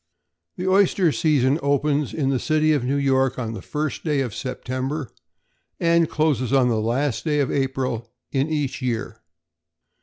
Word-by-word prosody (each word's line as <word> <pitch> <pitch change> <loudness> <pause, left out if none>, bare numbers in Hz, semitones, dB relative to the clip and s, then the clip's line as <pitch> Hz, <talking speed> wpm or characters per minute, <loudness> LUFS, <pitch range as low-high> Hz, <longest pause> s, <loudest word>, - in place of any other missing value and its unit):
=The 185 - -4
Oyster 185 -2 +3
Season= 145 -2 +2
opens 145 0 +1
in 140 -4 -1
the 135 -2 +1
city 155 +2 +2
of 145 -5 0
New 130 +3 0
York 135 -2 +2
on 115 -3 -3
the - - -6
first 150 0 -3
day 150 -4 +1
of 125 -5 -3
September, 130 +2 -4 0.7
and 170 -1 +3
closes 145 -6 0
on 130 -2 +4
the 110 -2 +1
last 120 +3 -1
day 150 -2 +1
of 140 - +1
April 130 -4 -2 0.2
in 135 +2 0
each 140 -4 -2
year. 115 -2 -3
135 Hz, 160 wpm, -23 LUFS, 130-150 Hz, 0.7 s, on